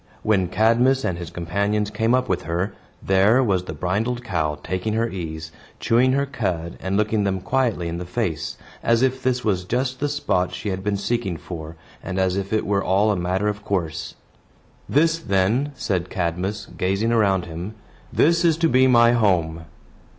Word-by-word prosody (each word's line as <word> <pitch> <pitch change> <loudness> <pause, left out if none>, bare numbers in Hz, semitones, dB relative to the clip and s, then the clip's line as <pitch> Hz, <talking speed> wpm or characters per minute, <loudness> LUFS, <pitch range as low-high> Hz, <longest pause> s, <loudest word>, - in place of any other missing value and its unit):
When 100 -4 +2
Cadmus 120 +7 +3
and 85 -2 -1
his 85 - -6
companions 100 +5 -1
came 110 +3 +2
up 130 0 0
with 95 - -1
her, 90 +5 -1 0.3
there 100 +7 +4
was 95 -6 +1
the 80 - -5
brindled 105 +10 -1
cow 80 -8 -1
taking 95 +4 -2
her 115 +1 +1
ease, 80 -5 -6 0.3
chewing 125 +3 +3
her 140 +1 +2
cud, 90 -11 -3
and 95 +1 -1
looking 105 0 +1
them 95 -1 0
quietly 110 -2 0
in 85 +1 -4
the 90 - -5
face; 85 -6 -2 0.2
as 115 +1 +2
if 130 0 +1
this 125 -1 0
was 95 -4 +1
just 125 +6 -1
the 145 - 0
spot 95 -11 0
she 105 - -4
had 95 0 -3
been 100 0 0
seeking 100 -4 -1
for, 80 -1 -8 0.3
and 95 - -5
as 95 -1 +1
if 100 0 -3
it 110 -1 +1
were 100 -1 +1
all 100 +4 +3
a - - +1
matter 90 +3 -1
of 105 -1 -3
course. 85 -6 -3 0.7
"This, 165 +3 +3
then," 110 +4 +1
said 95 -8 -2
Cadmus, 90 +4 -2
gazing 100 +5 0
around 100 -5 +2
him, 85 +6 -7 0.4
"this 170 +3 +3
is 165 -2 +3
to 165 0 +3
be 130 -3 +4
my 120 -2 +6
home." 85 -8 +1
100 Hz, 185 wpm, -23 LUFS, 90-120 Hz, 0.7 s, my